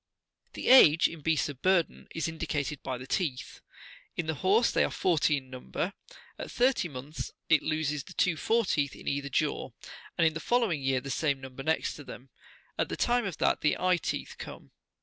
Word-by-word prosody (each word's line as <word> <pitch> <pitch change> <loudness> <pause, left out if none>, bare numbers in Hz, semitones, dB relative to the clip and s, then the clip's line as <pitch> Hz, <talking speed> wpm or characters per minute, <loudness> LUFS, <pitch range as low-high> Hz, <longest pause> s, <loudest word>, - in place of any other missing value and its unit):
The - - -3
age, 165 - +8
in 165 -2 -9
beasts 160 0 +1
of 145 -3 -8
burden,41 185 -3 +1
is 165 -1 -1
indicated 155 -3 -3
by 130 -1 -4
the 125 - -9
teeth. 135 -4 -3 0.6
In 170 - -1
the 160 - -1
horse 200 - +3
they - - +3
are - - +1
forty 155 -4 +2
in 130 -1 -9
number. 130 +8 -4 0.5
At - - -5
thirty 250 -6 +2
months 140 +1 -7 0.2
it 160 -3 +5
loses 150 -2 -1
the - - -12
two 180 -3 +2
fore 225 +7 +1
teeth 145 -6 0
in - - -12
either 140 0 -1
jaw, - - -1 0.5
and 165 - +4
in 160 - +3
the 160 - -4
following 225 - +1
year 130 -1 +1
the 140 +1 -6
same 140 +1 0
number 130 0 -9
next 160 +3 0
to 145 - -9
them, 130 -1 -11 0.5
at - - +1
the - - -4
time 240 -1 +2
that 190 -5 0
the 150 - +2
eye 185 -1 +2
teeth42 - - -4
come. - - -9
155 Hz, 200 wpm, -29 LUFS, 140-180 Hz, 0.6 s, age